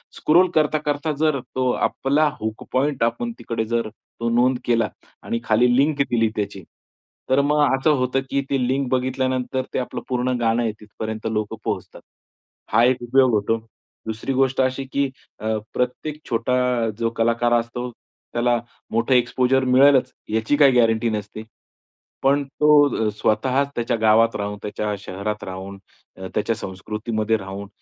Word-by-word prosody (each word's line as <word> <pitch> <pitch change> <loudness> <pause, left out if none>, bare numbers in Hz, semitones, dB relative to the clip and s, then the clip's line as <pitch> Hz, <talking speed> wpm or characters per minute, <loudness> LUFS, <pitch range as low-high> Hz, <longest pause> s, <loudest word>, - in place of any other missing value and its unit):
Scroll 175 +4 +4
करता-करता 150 0 +1
जर 155 -3 +2 0.2
तो 130 -1 +1 0.2
आपला 145 +3 +1
हुक 110 0 -4
पॉइंट 135 0 +1
आपण 120 0 -1
तिकडे 115 -1 -3
जर 115 0 -1
तो 115 +1 -6
नोंद 125 +2 +2
केला 115 -3 +2 0.3
आणि 115 - -2
खाली 120 +3 +3
लिंक 140 +1 +2
दिली 115 -2 +2
त्याची, 100 -2 -4 0.7
तर 130 +2 +4
मग 150 +1 +1 0.2
असं 145 +4 +2
होतं 130 +1 0
की 140 - +1
ती 135 -2 +1
लिंक 135 +1 0
बघितल्यानंतर 130 0 0
ते - - 0
आपलं 125 - -4
पूर्ण 125 0 0
गाणं 115 0 +2
आहे 115 - 0
तिथपर्यंत 110 +1 -6
लोकं 105 0 -2
पोहोचतात. - - -4 0.7
हा 115 - +5
एक 125 0 +2
उपयोग 130 +1 +4
होतो. 105 +2 +1 0.5
दुसरी 110 +5 -3
गोष्ट 130 0 +2
अशी 130 +1 0
की, 140 -1 +1 0.3
अ, 110 +1 -1 0.2
प्रत्येक 145 +5 -2
छोटा 115 +2 0 0.4
जो 115 -1 +1
कलाकार 115 +1 +2
असतो, 120 +2 -5
त्याला 120 +1 -2 0.3
मोठं 115 +3 +1
एक्स्पोजर 125 +1 +2
मिळेलच, 130 +1 +5 0.2
याची 110 +6 +1
काही 140 -2 +6
गॅरंटी 115 0 +2
नसते. 105 0 -5 0.8
पण 140 +1 +3
तो 150 +2 0 0.4
अ, - - +2
स्वतःच 130 +7 +1
त्याच्या 120 0 0
गावात 110 +1 +4
राहून, 105 0 -3
त्याच्या 105 0 -3
शहरात 100 +2 -5
राहून, 95 +1 -7 0.4
अ, 95 0 -6
त्याच्या 115 +2 0
संस्कृतीमध्ये 110 +3 -2
राहून 100 0 -7
120 Hz, 150 wpm, -22 LUFS, 110-130 Hz, 0.8 s, काही